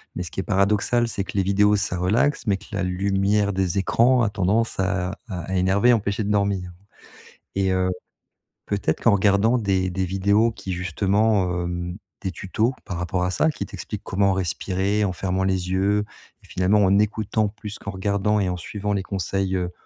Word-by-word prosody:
Mais 90 - -3
ce 85 - -8
qui - - -5
est 95 - -1
paradoxal, 105 +5 +2
c'est 100 -3 -2
que - - -9
les 95 - +3
vidéos 105 +2 +3
ça 100 -3 -1
relaxe, 110 +11 +1
mais 100 -2 +2
que 105 - -16
la 105 -2 -2
lumière 100 +2 +1
des 95 -1 -1
écrans 120 +6 +3
a 110 - +2
tendance 105 +4 0
à 95 +1 -1
à 90 -5 -5
à 95 - -1
énerver 95 +5 +3
et 125 - +7
empêcher 105 -1 0
de 105 - -1
dormir 100 -3 0 0.9
et 95 -1 +2
heu, 95 0 +1 0.8
peut-être 100 -6 -1
qu'en 115 - +5
regardant 100 +4 +3
des 95 -4 0
des 95 +1 -1
vidéos 100 +5 +2
qui 95 - -7
justement, 95 0 +1
hem, 85 0 -4 0.2
des 95 - -3
tutos 110 +7 -1
par 90 -5 -5
rapport 90 +1 -1
à 90 - 0
ça, 160 - +2
qui - - -4
t'expliquent - - -7
comment 100 0 +1
respirer 95 +2 -1
en 95 - -1
fermant 95 +1 -1
les 95 -1 -1
yeux 100 +2 +2 0.4
et - - -18
finalement 95 +3 +2
en 100 +1 +4
écoutant 105 0 0
plus 105 0 -8
qu'en 100 - -6
regardant 100 +2 0
et 95 - 0
en 90 - -2
suivant 105 +4 -4
les 100 -2 0
conseils, 95 0 -2
heu, 90 -1 -2
100 Hz, 195 wpm, -23 LUFS, 95-105 Hz, 0.9 s, et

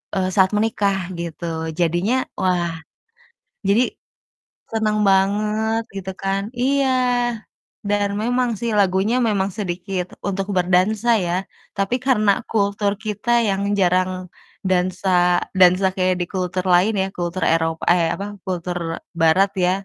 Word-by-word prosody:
eee, 185 -1 0
saat 190 -1 +4
menikah 210 -3 +1 0.2
gitu, 170 0 -5 0.3
jadinya 175 +7 +1 0.2
wah, 175 -2 +1 1.0
jadi 210 +5 +4 0.9
seneng 215 -1 0
banget 210 +3 +1
gitu 190 -1 -5
kan 195 0 -1 0.2
iya, 275 +1 +2 1.0
dan 205 0 +1
memang 245 +2 +1
sih 235 0 -2
lagunya 195 +4 +2
memang 195 -2 0
sedikit 185 -1 -3 0.2
untuk 195 0 -2
berdansa 185 +6 +2 0.2
ya. 170 - -1 0.4
Tapi 195 +5 0
karena 215 -6 +3 0.2
kultur 200 -1 +1
kita 215 +2 -4 0.2
yang 195 -1 0 0.2
jarang 185 0 +2 0.6
dansa 185 +1 0 0.5
dansa 185 +1 +6
kayak 185 -1 +1
di - - 0
kultur 185 -1 -1
lain 185 +5 +4
ya, 190 - 0
kultur 175 +1 -3
Eropa 165 0 -1
eh, 175 -1 +2
apa, 200 - -5 0.2
kultur 180 -1 -3 0.4
Barat 185 +5 +4 0.2
ya. 180 - +3
195 Hz, 125 wpm, -21 LUFS, 180-210 Hz, 1.0 s, dansa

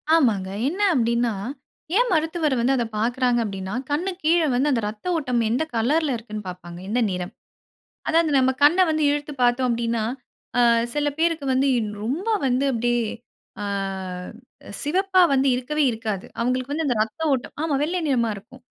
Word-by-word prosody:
ஆமாங்க. 215 -12 +2 0.2
என்னா 380 +8 0
அப்டின்னா, 235 -1 +1 0.6
ஏன் - - +3
மருத்துவர் 320 -2 +1
வந்து 245 +3 +2
அத 240 -2 0
பாக்கிறாங்க 245 +2 +1
அப்டின்னா, 195 -1 -5 0.2
கண்ணுக் 360 +5 -2
கீழ 330 +3 +4
வந்து 265 +4 +2
அந்த 235 - +1
ரத்த 210 +6 -8
ஓட்டம் 250 -6 0
எந்த 250 +7 +1
கலர்ல 275 +5 +1
இருக்குன்னு 215 -2 -8
பாப்பாங்க. 175 -1 -9
எந்த 240 +4 +1
நிறம். 180 +2 -4 0.7
அதாவது 325 -1 +3
நம்ம 260 0 +4
கண்ண 330 +6 +6
வந்து 310 -1 +1
இழுத்து 290 0 -3
பாத்தோம் 245 +1 +2
அப்டின்னா, 230 -1 0 0.6
அ - - +6 0.3
சில 295 0 0
பேருக்கு 330 -3 +1
வந்து 265 +2 +2 0.4
ரொம்ப 295 - -2 0.2
வந்து, 260 +1 +1
அப்டியே 240 0 +1 0.6
அ - - -2 1.2
சிவப்பா 375 +5 +2
வந்து 270 0 +3
இருக்கவே 295 +5 -1
இருக்காது. 220 -4 -4
அவுங்களுக்கு 255 +3 -1
வந்து 320 +1 -1
அந்த 250 - +1
இரத்த 220 +8 -3
ஓட்டம் 255 - -3
ஆமா 320 - 0
வெள்ளை 350 +4 -1
நிறமா 240 -5 +2
இருக்கும். 230 +6 -14
255 Hz, 155 wpm, -23 LUFS, 230-305 Hz, 1.2 s, கண்ண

